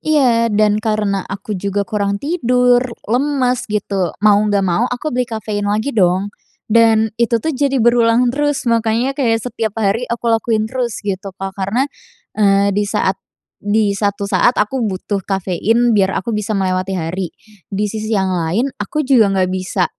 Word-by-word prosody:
Iya, 250 -7 +2
dan 210 0 +2
karena 215 -3 0
aku 200 +2 -6
juga 200 +1 -2
kurang 200 -2 -1
tidur, 250 - +2 0.2
lemes 255 0 0
gitu, 200 -4 -2
mau 205 -1 +6
nggak 200 -1 +1
mau 190 +7 +1
aku 250 +4 -4
beli 250 0 -1
kafein 210 -2 -3
lagi 215 +7 -1
dong, 190 0 +1 0.4
dan 220 -1 +4
itu 235 0 +3
tuh 315 +8 -2
jadi 275 0 0
berulang 240 0 +3
terus. 290 0 -1
Makanya 230 +2 +1
kayak 230 -5 0
setiap 225 -3 -3
hari 225 +3 0
aku 235 0 -4
lakuin 225 -1 +1
terus 240 0 -3
gitu, 195 -1 -4
Kak 195 0 -5
karena, 200 +7 -1 0.5
eee, 200 -1 +3
di 205 +2 +1
saat 195 -2 0 0.4
di 205 0 +1
satu 200 0 -1
saat 245 +4 +2
aku 245 +5 0
butuh 195 +1 -3
kafein 200 +5 +1
biar 195 -2 +2
aku 230 +4 -4
bisa 210 -1 -3
melewati 185 0 -1
hari, 175 +2 -3 0.4
di 200 +2 -2
sisi 215 +1 -4
yang 190 -1 0
lain 180 +10 -1
aku 295 +9 -3
juga 240 -6 +5
nggak 185 -1 +1
bisa 185 0 -1
215 Hz, 165 wpm, -17 LUFS, 195-240 Hz, 0.5 s, mau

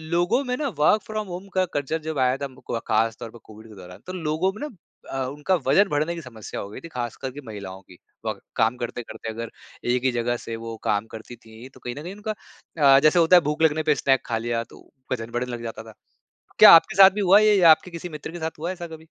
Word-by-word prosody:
लोगों 220 +11 +2
में 250 -1 -2
ना, 295 - -2
वर्क 210 +8 +4
फ्रॉम 215 -2 -4
होम 180 +2 -7
का 185 - +3
कल्चर 155 +3 -2
जब 150 -4 -3
आया 130 +1 +1
था, 140 - -4
हम 130 -2 -10
को - - -18
को - - -7
अ, 115 - -1
ख़ास 110 0 +1
तौर 115 -2 -7
पे 120 - -13
कोविड 110 +1 -14
के 105 - -14
दौरान, 90 -1 -12
तो 185 - -6
लोगों 165 +5 +1
में 215 - -11
ना - - -10 0.4
अ, 135 -1 -2
उनका 150 +7 0
वज़न 195 +9 +5
बढ़ने 155 +4 -1
की 165 - -7
समस्या 115 -6 -8
हो 100 - -8
गई - - -9
थी, 165 - -9
खासकर 125 +2 -4
कि 145 +2 -9
महिलाओं 95 -3 -8
की। 90 -2 -18 0.3
व - - -1 0.2
काम 115 +2 +1
करते-करते 115 -2 -6
अगर 115 +1 -6 0.4
एक 125 0 0
ही 130 - +2
जगह 120 0 -1
से 115 - -5
वो 115 0 -5
काम 105 +1 0
करती 110 +2 -9
थीं, 115 +2 -14
तो 130 - -19
कहीं 120 +1 -6
न 150 - -8
कहीं 180 +3 -7
उनका 210 +1 -4
अ, 140 -9 +2
जैसे 155 +4 +4
होता 170 +2 +6
है, 175 - +7
भूख 150 +1 -3
लगने 155 0 +3
पे - - +3
स्नैक 135 0 +1
खा 115 -2 -2
लिया, 115 0 -2
तो - - -18 0.2
वज़न 115 -2 -3
बढ़ने 125 +1 -3
लग 120 -1 -6
जाता 115 -1 -6
था। 110 -1 -13 0.7
क्या - - +11
आपके - - -11
साथ 190 0 +9
भी 205 +1 -3
हुआ 195 +1 +6
ये, 215 -1 +4
या 170 -2 +7
आपके 175 +3 +2
किसी 170 +1 -7
मित्र 150 +1 -8
के 175 - -8
साथ 160 -1 -5
हुआ 170 +3 -3
ऐसा 175 -2 -7
कभी? 160 -1 -11
135 Hz, 270 wpm, -24 LUFS, 115-170 Hz, 0.7 s, क्या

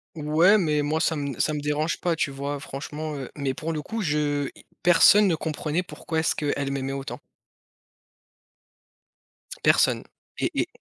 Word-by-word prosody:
Ouais, 160 +7 +4
mais 150 -5 +1
moi 155 +2 0
ça 160 -2 +1
me 140 -4 -4
ça 155 - +1
me 150 - -2
dérange 150 +2 -1
pas, 175 -2 0
tu 150 -3 -1
vois? 140 +1 -4
Franchement, 150 +3 -6
heu 135 - -6
mais 140 -2 -2
pour 160 +4 -4
le 150 - -3
coup 225 +8 -4
je 150 -4 0 0.3
personne 180 +4 +6
ne 170 - +2
comprenait 160 +2 -2
pourquoi 165 -3 -4
est-ce 160 - +1
qu'elle 145 -2 -1
m'aimait 135 0 -3
autant 135 +1 -5 2.4
personne - - +4 0.3
et - - -1
et - - +1
150 Hz, 160 wpm, -25 LUFS, 145-165 Hz, 2.4 s, personne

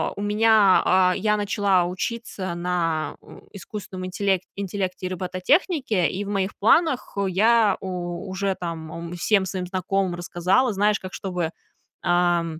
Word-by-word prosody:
у - - -6
меня 210 -1 +4
а, 185 0 +4
я 210 0 +1
начала 200 -3 +2
учиться 185 0 -4
на 170 -3 -1
у - - -14
искусственном 190 0 -7
интелек 190 0 0
интеллекте 190 -2 -3
и - - -5
робототехнике, 185 - +1
и 195 +2 -4
в 200 - -7
моих 195 -1 -1
планах 260 0 +2
я 215 +3 +3
у 180 0 -5
уже 190 +1 -1
там, 165 -2 -6
ам, 170 +1 -7
всем 195 +2 +2
своим 185 -1 -4
знакомым 185 0 -1
рассказала. 175 +8 +1
Знаешь, 205 +1 +2
как 185 0 -8
чтобы, 180 -4 -3 0.5
ам, 175 -2 +1
190 Hz, 145 wpm, -24 LUFS, 175-205 Hz, 0.5 s, меня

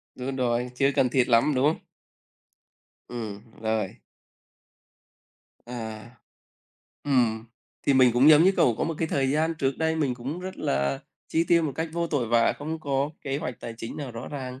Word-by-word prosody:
Đúng 130 +1 -4
rồi, 125 -1 0
chưa 135 +2 +3
cần 125 - +3
thiết 125 -1 +2
lắm, 120 +5 +4
đúng 130 +2 +2
không? 155 - 0 1.3
Ừm, 110 -2 -7
rồi. 110 -3 -1 1.7
À, 115 -2 -7 0.9
ừm, 120 -5 +1 0.4
thì 140 - +2
mình 130 -2 +6
cũng 125 +5 +5
giống 155 +2 +7
như 190 - +5
cậu 120 - +4
có - - +1
một 165 - -2
cái 165 - -1
thời 135 -3 +1
gian 160 +3 +1
trước 135 -3 -1
đây 160 0 +1
mình 140 -5 0
cũng 135 +8 -5
rất 185 +1 -6
là 70 0 -1 0.3
chi 165 - +1
tiêu 170 -1 +5
một 150 -3 -1
cách 160 +1 -2
vô 170 0 -1
tội 145 -7 -1
vạ, 115 +1 +3
không 155 +2 -4
có 140 0 -1
kế 135 0 -2
hoạch 125 -4 -5
tài 115 - -6
chính 115 0 -7
nào 140 -4 -5
rõ 115 -1 -7
ràng, 130 -2 -6
130 Hz, 185 wpm, -26 LUFS, 120-150 Hz, 1.7 s, giống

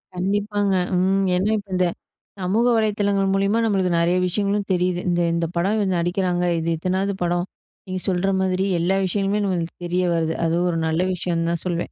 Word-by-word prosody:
கண்டிப்பாங்க, 205 +2 0 0.2
ம். 190 +2 +2
ஏன்னா 190 +3 +1
இப்ப 200 -1 -8
இந்த, 180 0 +2 0.5
சமூக 195 +6 +1
வலைதளங்கள் 205 -3 +1
மூலியமா 195 +3 +2
நம்மளுக்கு 190 -4 +1
நெறைய 170 +2 +2
விஷயங்களும் 200 +2 -1
தெரியிது. 180 0 0
இந்த 175 0 +1
இந்த 170 0 0
படம் 190 +5 +1
இவு 210 - +1
நடிக்கிறாங்க, 175 +1 0 0.2
இது 165 +1 -2
இத்தனாது 190 +4 -1
படம், 175 0 0 0.4
நீங்க 185 0 -4
சொல்ற 190 +1 +1
மாதிரி 190 0 0
எல்லா 185 +3 +1
விஷயங்களுமே 200 +2 0
நம்மளுக்கு 175 -3 -2
தெரிய 180 +1 0
வருது. 165 -1 0
அதுவும் 170 +2 +1
ஒரு 165 - -1
நல்ல 160 +2 0
விஷயன்னு 170 -1 -1
தான் 170 - -3
சொல்வேன். 175 -1 -2
185 Hz, 170 wpm, -22 LUFS, 175-200 Hz, 0.5 s, ம்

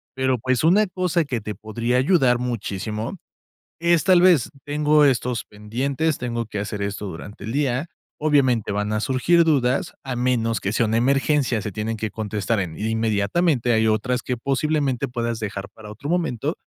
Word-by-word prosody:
Pero, 130 -1 +1
pues, 130 +3 0
una 195 +6 +4
cosa 180 -2 0
que 125 -6 -3
te 105 0 -5
podría 115 +4 -2
ayudar 130 -4 +3
muchísimo 110 - -4 0.6
es, 170 -1 +3
tal 185 -2 +6
vez: 175 -9 +5 0.2
"Tengo 150 +1 +3
estos 125 -2 +1
pendientes, 130 +9 -2
tengo 120 -1 -3
que 105 -1 -5
hacer 105 0 -4
esto 100 +1 -3
durante 100 +4 -9
el 110 - -4
día", 140 +2 0 0.3
obviamente, 130 -8 +2
van 105 +1 -1
a 105 - 0
surgir 135 +8 +3
dudas, 140 -5 +1
a 130 -2 -4
menos 120 -2 0
que 100 - -1
sea 115 +1 +2
una 110 +1 +1
emergencia, 135 -2 +2
se 105 - -4
tienen 110 +2 -3
que 110 0 -3
contestar 110 0 -2
en 80 -4 -5
inmediatamente, 110 - +1
hay 110 0 +3
otras 120 +4 0
que 125 -2 -2
posiblemente 140 0 0
puedas 120 -2 -2
dejar 100 -2 -5
para 105 -1 -10
otro 140 +8 -7
momento. 160 - -1
120 Hz, 170 wpm, -22 LUFS, 110-145 Hz, 0.6 s, tal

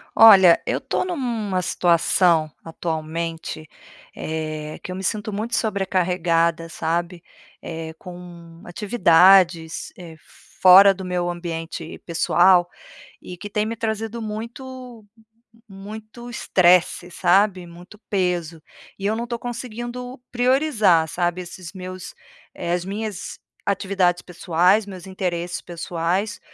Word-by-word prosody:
Olha, 195 -6 +8
eu - - 0
estou - - -2
em 370 - -4
uma 225 - -2
situação, 170 -2 +2
atualmente, 160 -1 -5 0.4
eh, 155 -1 -5
que - - -6
eu - - -5
me 190 - -6
sinto 215 +1 -2
muito 215 +4 -3
sobrecarregada, 180 -5 0
sabe. 170 +2 -3 0.4
Eh, 160 -1 -6
com 175 -2 -12
atividades, 175 -4 +3
eh, 165 -3 -11 0.4
fora 195 +2 +9
do 190 0 -8
meu 180 -1 -1
ambiente 165 -1 -6
pessoal, 175 +1 +3 0.5
e 180 - -9
que 205 +4 -8
têm 210 +1 -1
me 225 +1 -3
trazido 225 +1 -3
muito 235 +2 -8 0.6
muito 215 +4 -10
estresse, 180 -5 +2
sabe, 185 0 +2
muito 175 +5 -14
peso, 175 -4 -1 0.4
e 195 - -5
eu 210 +2 +1
não 235 - -3
estou 235 0 -4
conseguindo 245 +1 -6
priorizar, 245 - +3
sabe, 175 +1 -1
esses 175 -1 -10
meus, 185 -1 -8 0.4
eh, 170 - -4
as 175 0 -2
minhas 205 0 -5 0.3
atividades 190 -3 +1
pessoais, 180 +4 +1
meus 190 -3 -10
interesses 175 -2 -3
pessoais, 175 +4 -3
185 Hz, 120 wpm, -22 LUFS, 170-210 Hz, 0.6 s, fora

